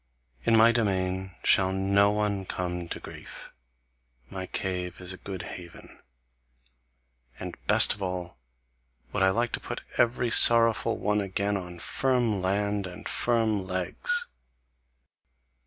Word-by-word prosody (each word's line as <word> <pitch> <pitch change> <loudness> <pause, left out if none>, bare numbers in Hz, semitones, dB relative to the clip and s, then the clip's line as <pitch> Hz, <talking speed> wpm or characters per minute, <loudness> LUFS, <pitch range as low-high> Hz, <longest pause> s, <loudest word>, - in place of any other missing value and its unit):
In 115 - +4
my 115 +1 +7
domain 95 -4 -1
shall 95 0 +4
no 100 +1 +3
one 105 -1 -1
come 90 -2 -4
to - - -5
grief; - - -11 0.8
my 95 -1 -5
cave 90 -2 -3
is 90 0 -4
a - - -9
good 95 -2 -7
haven. 85 -1 -10 1.4
And - - -6
best - - +5
of 100 - -13
all 90 -6 -4 0.7
would - - -1
I 95 - +5
like 120 +4 0
to - - -2
put - - -6 0.2
every 120 0 +2
sorrowful 115 -1 +5
one 105 0 0
again 100 +1 -1
on 90 -2 -6
firm 120 +1 0
land 100 +1 -1
and 90 - -9
firm 110 -5 0
legs. 475 - 0
100 Hz, 130 wpm, -27 LUFS, 95-110 Hz, 1.4 s, my